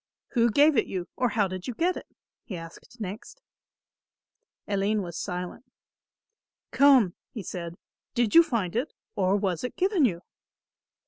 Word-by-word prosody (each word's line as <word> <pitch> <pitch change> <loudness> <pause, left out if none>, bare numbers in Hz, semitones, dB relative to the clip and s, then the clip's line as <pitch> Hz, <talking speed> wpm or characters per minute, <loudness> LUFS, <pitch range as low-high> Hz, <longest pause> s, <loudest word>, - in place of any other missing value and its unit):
"Who 235 -2 +3
gave 290 +6 +5
it - - +2
you, 185 -2 -4
or 250 -1 +1
how 205 -2 +1
did 185 -1 -6
you 250 - -4
get 355 +6 +1
it?" - - -8 0.4
he 190 - -6
asked 165 +8 -12
next. 210 - -7 1.3
Aline 205 +1 +1
was 170 -2 -7
silent. 180 +5 -5 1.1
"Come," 265 -10 +5 0.2
he 215 - -7
said, 170 -1 -6 0.4
"did 240 -3 +1
you 335 - +10
find 220 - -1
it, 255 +7 -1 0.2
or 190 0 +2
was 195 -5 -1
it 250 - -4
given 375 -5 +3
you?" 175 -6 -1
210 Hz, 150 wpm, -27 LUFS, 185-250 Hz, 1.3 s, you